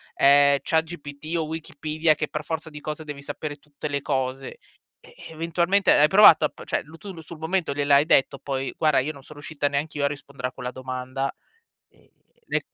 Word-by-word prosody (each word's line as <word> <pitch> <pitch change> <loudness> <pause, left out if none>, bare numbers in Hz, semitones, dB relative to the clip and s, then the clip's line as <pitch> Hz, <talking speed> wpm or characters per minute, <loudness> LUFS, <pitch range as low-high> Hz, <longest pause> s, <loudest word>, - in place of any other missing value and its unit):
ehm, 140 0 +6
ChatGPT 160 -1 -2
o 160 - 0
Wikipedia, 155 0 -1
che 155 0 -2
per 150 0 -5
forza 160 +1 -4
di 150 -1 -10
cose 155 +1 -5
devi 145 -2 -7
sapere 145 +1 -5
tutte 145 0 -8
le 140 -1 -2
cose, 130 -1 -3 0.4
eh, - - -19
eventualmente 170 +4 +1
hai 150 - +6
provato 180 -3 +7
a - - 0
p - - -13
cioè - - -2
lu 160 +2 -15
tu 200 +1 -8
lu 165 - -10
sul 160 +1 -11
momento 160 -2 -1
gliel'hai 145 0 +4
detto 140 -3 +3
poi: 135 -1 -3
"Guarda, 155 -4 +3
io 150 +4 -2
non 140 -2 -14
son 150 - -13
riuscita 145 -1 -2
neanch'io 145 +1 -2
a - - +4
rispondere 140 -3 -5
a - - -19
quella 125 0 -6
domanda"? 130 +1 -4 0.6
Ehm, - - -28 0.4
ne - - 0
150 Hz, 200 wpm, -24 LUFS, 140-160 Hz, 0.6 s, provato